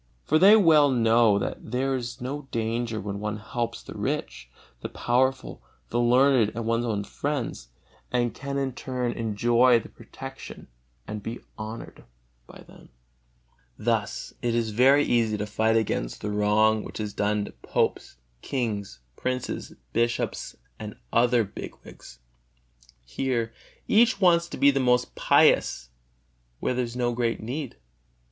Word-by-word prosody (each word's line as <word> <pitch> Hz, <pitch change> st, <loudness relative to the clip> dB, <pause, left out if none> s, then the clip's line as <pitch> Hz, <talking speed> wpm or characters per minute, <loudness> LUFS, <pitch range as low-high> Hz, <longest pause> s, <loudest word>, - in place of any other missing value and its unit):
For 155 Hz, -, +3 dB
they 200 Hz, +5 st, +8 dB
well 160 Hz, -8 st, +6 dB
know 115 Hz, -4 st, +4 dB
that 100 Hz, -, -3 dB
there 135 Hz, +2 st, 0 dB
is 120 Hz, -2 st, -5 dB
no 135 Hz, +3 st, -5 dB
danger 115 Hz, 0 st, -2 dB
when 100 Hz, -1 st, -5 dB
one 105 Hz, 0 st, -3 dB
helps 115 Hz, +2 st, -4 dB
the -, -, -9 dB
rich, 60 Hz, -1 st, -4 dB, 0.3 s
the -, -, -6 dB
powerful, 130 Hz, +2 st, 0 dB, 0.3 s
the 120 Hz, -, 0 dB
learned 125 Hz, -1 st, +4 dB
and 115 Hz, -1 st, -3 dB
one's 115 Hz, +1 st, 0 dB
own 105 Hz, -3 st, -1 dB
friends, 140 Hz, -, -4 dB, 0.4 s
and 120 Hz, -1 st, 0 dB
can 140 Hz, 0 st, -5 dB
in 135 Hz, -2 st, -1 dB
turn 125 Hz, -1 st, -3 dB
enjoy 120 Hz, +2 st, +3 dB
their -, -, -12 dB
protection -, -, -10 dB, 0.4 s
and 105 Hz, 0 st, -5 dB
be 115 Hz, +3 st, -6 dB, 0.2 s
honored 110 Hz, +1 st, -8 dB, 0.4 s
by -, -, -13 dB
them. -, -, -17 dB, 0.9 s
Thus 110 Hz, -2 st, -2 dB
it 120 Hz, -1 st, 0 dB
is 115 Hz, -2 st, 0 dB
very 135 Hz, +6 st, +5 dB
easy 115 Hz, -5 st, +1 dB
to 105 Hz, -, -2 dB
fight 110 Hz, +2 st, +1 dB
against 100 Hz, -, -2 dB
the 105 Hz, -, -3 dB
wrong 105 Hz, +1 st, +3 dB
which -, -, -8 dB
is 105 Hz, -1 st, -4 dB
done 105 Hz, 0 st, 0 dB
to -, -, -9 dB
popes, -, -, -2 dB, 0.3 s
kings, 105 Hz, -, -3 dB
princes, 130 Hz, -, -4 dB, 0.2 s
bishops 120 Hz, 0 st, -1 dB, 0.2 s
and 105 Hz, -1 st, -7 dB, 0.2 s
other 120 Hz, 0 st, +4 dB
big 100 Hz, -, -8 dB
wigs. -, -, -13 dB, 0.9 s
Here 115 Hz, -, -2 dB, 0.3 s
each 230 Hz, 0 st, +4 dB
wants 170 Hz, -3 st, +4 dB
to -, -, -6 dB
be 140 Hz, -, +6 dB
the 135 Hz, -, 0 dB
most 125 Hz, -1 st, +2 dB
pious, -, -, +3 dB, 0.7 s
where -, -, -1 dB
there 125 Hz, 0 st, 0 dB
is 115 Hz, 0 st, -8 dB
no 120 Hz, -1 st, 0 dB
great 120 Hz, -1 st, -1 dB
need. 125 Hz, -, -5 dB
120 Hz, 150 wpm, -26 LUFS, 110-130 Hz, 0.9 s, they